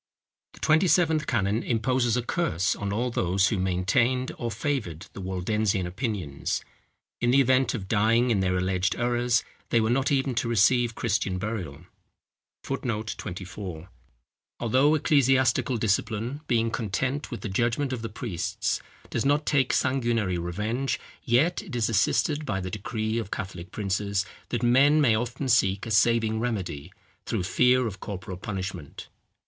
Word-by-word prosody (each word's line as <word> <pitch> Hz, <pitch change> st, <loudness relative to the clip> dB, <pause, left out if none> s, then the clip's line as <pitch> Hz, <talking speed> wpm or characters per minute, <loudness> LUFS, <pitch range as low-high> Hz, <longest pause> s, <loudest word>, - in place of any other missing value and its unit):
The -, -, -15 dB
Twenty 160 Hz, +4 st, +3 dB
seventh 160 Hz, -3 st, +3 dB
canon 105 Hz, -1 st, +1 dB
imposes 120 Hz, 0 st, +1 dB
a 125 Hz, -, -1 dB
curse 95 Hz, -, 0 dB
on 100 Hz, -1 st, -4 dB
all 120 Hz, +4 st, -1 dB
those 95 Hz, -1 st, +2 dB
who 105 Hz, -, -1 dB
maintained 115 Hz, +8 st, +1 dB
or 120 Hz, -, -2 dB
favoured 110 Hz, -, -3 dB
the 100 Hz, -, -7 dB
Waldensian 95 Hz, +1 st, 0 dB
opinions. 90 Hz, -, -3 dB, 0.5 s
In 120 Hz, -, +1 dB
the 135 Hz, +3 st, +5 dB
event 130 Hz, 0 st, +3 dB
of 95 Hz, -5 st, -5 dB
dying 115 Hz, +4 st, +3 dB
in 105 Hz, -, +2 dB
their 90 Hz, -1 st, +1 dB
alleged 95 Hz, +1 st, 0 dB
errors, 120 Hz, 0 st, +1 dB, 0.3 s
they 115 Hz, -, +3 dB
were 110 Hz, +1 st, +1 dB
not 135 Hz, +3 st, +1 dB
even 135 Hz, -1 st, +1 dB
to 115 Hz, -, -3 dB
receive 115 Hz, +2 st, +3 dB
Christian 105 Hz, -5 st, 0 dB
burial. 95 Hz, -8 st, -5 dB, 0.8 s
[Footnote 115 Hz, -5 st, -3 dB
24: 90 Hz, -2 st, -7 dB, 0.7 s
"Although 130 Hz, +6 st, +3 dB
ecclesiastical 135 Hz, -4 st, +3 dB
discipline, 110 Hz, +5 st, -1 dB
being 115 Hz, -1 st, +1 dB
content 130 Hz, +7 st, -2 dB
with 120 Hz, -, -6 dB
the -, -, -4 dB
judgment 120 Hz, +7 st, 0 dB
of 120 Hz, -, -4 dB
the 115 Hz, -, -4 dB
priests, 105 Hz, -5 st, -2 dB, 0.3 s
does -, -, 0 dB
not 145 Hz, +2 st, +2 dB
take 135 Hz, -4 st, +2 dB
sanguinary 115 Hz, -8 st, +1 dB
revenge, 105 Hz, +10 st, -2 dB, 0.3 s
yet 145 Hz, +9 st, +2 dB
it 175 Hz, -11 st, -8 dB
is 115 Hz, -3 st, +1 dB
assisted 145 Hz, +7 st, +1 dB
by 95 Hz, -9 st, -2 dB
the 95 Hz, -1 st, -5 dB
decrees 110 Hz, +2 st, -2 dB
of 110 Hz, -, -5 dB
Catholic 95 Hz, -2 st, -6 dB
princes, 100 Hz, 0 st, -1 dB, 0.2 s
that 120 Hz, 0 st, -2 dB
men 140 Hz, +5 st, +5 dB
may 135 Hz, -7 st, +4 dB
often 120 Hz, +4 st, -2 dB
seek 100 Hz, -5 st, +2 dB
a 115 Hz, -, -5 dB
saving 110 Hz, 0 st, +3 dB
remedy, 95 Hz, -9 st, -3 dB, 0.4 s
through -, -, -1 dB
fear 125 Hz, +7 st, +3 dB
of 105 Hz, -2 st, -5 dB
corporal 95 Hz, -2 st, -6 dB
punishment. 95 Hz, -6 st, -6 dB
115 Hz, 155 wpm, -26 LUFS, 95-125 Hz, 0.8 s, the